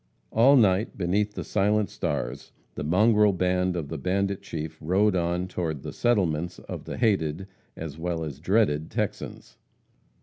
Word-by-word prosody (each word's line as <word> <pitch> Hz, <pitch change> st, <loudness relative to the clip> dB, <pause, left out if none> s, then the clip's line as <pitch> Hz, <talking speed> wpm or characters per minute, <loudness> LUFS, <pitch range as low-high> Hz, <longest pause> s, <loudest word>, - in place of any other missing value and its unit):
All 125 Hz, +6 st, +6 dB
night, 105 Hz, -3 st, +3 dB
beneath 100 Hz, +3 st, 0 dB
the -, -, -4 dB
silent 105 Hz, +1 st, +1 dB
stars, 75 Hz, -5 st, -3 dB, 0.2 s
the -, -, -5 dB
mongrel 105 Hz, +5 st, +4 dB
band 90 Hz, 0 st, +1 dB
of 80 Hz, -5 st, -4 dB
the 80 Hz, -, -4 dB
bandit 100 Hz, +5 st, -1 dB
chief 80 Hz, -4 st, -6 dB
rode 95 Hz, +5 st, +2 dB
on 90 Hz, +1 st, 0 dB
toward 80 Hz, -6 st, -3 dB
"the -, -, -6 dB
settlements" 90 Hz, -8 st, 0 dB
of -, -, -8 dB
the -, -, -6 dB
hated, 95 Hz, -7 st, +1 dB, 0.3 s
as 80 Hz, -1 st, -7 dB
well 85 Hz, -1 st, -2 dB
as 75 Hz, -3 st, -6 dB
dreaded 85 Hz, -4 st, +1 dB
Texans. -, -, -4 dB
90 Hz, 155 wpm, -26 LUFS, 80-105 Hz, 0.3 s, All